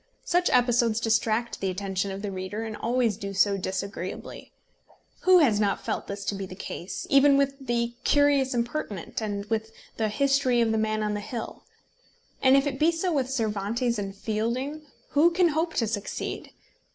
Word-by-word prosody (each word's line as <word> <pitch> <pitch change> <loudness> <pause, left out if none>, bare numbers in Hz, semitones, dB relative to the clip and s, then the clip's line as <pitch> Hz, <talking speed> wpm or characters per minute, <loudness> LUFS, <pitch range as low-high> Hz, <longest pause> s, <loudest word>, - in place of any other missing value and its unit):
Such 355 +1 +2
episodes 240 -2 +3
distract 225 +1 0
the 195 - 0
attention 190 +1 -2
of 195 +1 -6
the 205 - -3
reader, 190 +3 -4
and 220 -1 -5
always 235 -2 0
do 200 -2 -6
so 200 +1 +3
disagreeably. 190 -1 -5 0.7
Who 370 0 +8
has 245 -11 +4
not 200 -2 0
felt - - -3
this 200 0 -6
to - - -1
be 195 -1 -5
the 185 - -9
case 185 -1 -6
even 275 0 +6
with 275 0 +2
The 240 -2 -1
Curious 285 -3 +3
Impertinent 235 - -3
and 205 -2 -3
with 220 0 -2 0.3
the 220 -1 0
History 270 +1 +2
of 230 -1 +3
the 220 - +1
Man 215 0 0
of 210 0 -1
the 205 - -2
Hill. 225 +2 -6 0.8
And 265 +1 +6
if 275 - +2
it 270 -2 -3
be 320 +2 +4
so 340 +1 -1
with 265 -4 0
Cervantes 230 0 -1
and 195 -1 -5
Fielding, 240 +9 -3 0.2
who 305 +4 +5
can 350 0 +3
hope 325 +2 -1
to 230 - +2
succeed? 210 -2 -4
225 Hz, 180 wpm, -26 LUFS, 205-275 Hz, 0.8 s, Who